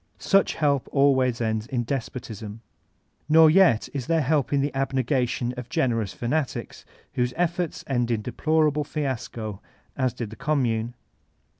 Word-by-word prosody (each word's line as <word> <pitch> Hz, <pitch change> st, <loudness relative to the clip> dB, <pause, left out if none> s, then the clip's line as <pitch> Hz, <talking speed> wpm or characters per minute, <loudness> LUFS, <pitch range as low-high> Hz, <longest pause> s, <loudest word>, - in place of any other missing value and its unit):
Such 195 Hz, -, +2 dB
help 140 Hz, -4 st, +1 dB
always 130 Hz, -4 st, +3 dB
ends 110 Hz, -1 st, -1 dB
in 125 Hz, -3 st, -1 dB
despotism. 115 Hz, -4 st, -5 dB, 0.7 s
Nor 160 Hz, 0 st, +7 dB
yet 165 Hz, -, +4 dB
is 135 Hz, -4 st, -4 dB
there 165 Hz, -1 st, +2 dB
help 145 Hz, -1 st, +1 dB
in 140 Hz, -, +2 dB
the 140 Hz, +1 st, 0 dB
abnq[a 135 Hz, -2 st, 0 dB
tion 120 Hz, 0 st, -2 dB
of 125 Hz, -1 st, -7 dB
generous 115 Hz, -6 st, 0 dB
fanatics 130 Hz, +8 st, -3 dB, 0.3 s
whose 125 Hz, 0 st, -1 dB
efforts 175 Hz, -1 st, -1 dB
end 120 Hz, -3 st, 0 dB
in 110 Hz, -3 st, -1 dB
deplorable 150 Hz, +3 st, +1 dB
fiasco, 120 Hz, -8 st, -4 dB, 0.3 s
as 130 Hz, -3 st, 0 dB
did 115 Hz, -4 st, -5 dB
the -, -, -8 dB
Commune. 120 Hz, -7 st, -1 dB
130 Hz, 145 wpm, -25 LUFS, 115-150 Hz, 0.7 s, Nor